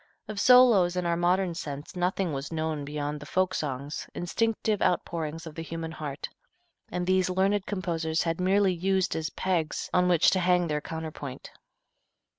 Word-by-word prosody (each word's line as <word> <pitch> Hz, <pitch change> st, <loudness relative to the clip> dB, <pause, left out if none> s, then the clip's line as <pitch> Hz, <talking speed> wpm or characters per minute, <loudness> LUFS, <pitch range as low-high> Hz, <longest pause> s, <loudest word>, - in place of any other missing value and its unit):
Of 215 Hz, -2 st, -5 dB
solos 230 Hz, -8 st, +6 dB
in 180 Hz, -1 st, -1 dB
our 170 Hz, 0 st, +1 dB
modern 175 Hz, +1 st, +1 dB
sense 150 Hz, -1 st, -6 dB
nothing 180 Hz, -1 st, 0 dB
was 140 Hz, +2 st, -4 dB
known 160 Hz, -2 st, -2 dB
beyond 145 Hz, +1 st, -4 dB
the 145 Hz, -, -10 dB
folk 185 Hz, +1 st, +1 dB
songs, 140 Hz, -1 st, -4 dB
instinctive 215 Hz, +3 st, 0 dB
outpourings 165 Hz, -2 st, -1 dB
of 160 Hz, -, -8 dB
the 165 Hz, -, -6 dB
human 165 Hz, 0 st, -5 dB
heart, 150 Hz, -3 st, -5 dB, 0.6 s
and 180 Hz, 0 st, -2 dB
these 185 Hz, 0 st, +2 dB
learned 190 Hz, +2 st, +1 dB
composers 165 Hz, -5 st, -1 dB
had 165 Hz, +1 st, -1 dB
merely 190 Hz, +1 st, +3 dB
used 190 Hz, +1 st, 0 dB
as 160 Hz, -1 st, -2 dB
pegs 175 Hz, -5 st, -2 dB
on 180 Hz, 0 st, +4 dB
which 175 Hz, -2 st, +5 dB
to 190 Hz, -, +2 dB
hang 180 Hz, 0 st, +3 dB
their 150 Hz, 0 st, -1 dB
counterpoint. 155 Hz, -5 st, -7 dB
175 Hz, 165 wpm, -28 LUFS, 155-185 Hz, 0.6 s, solos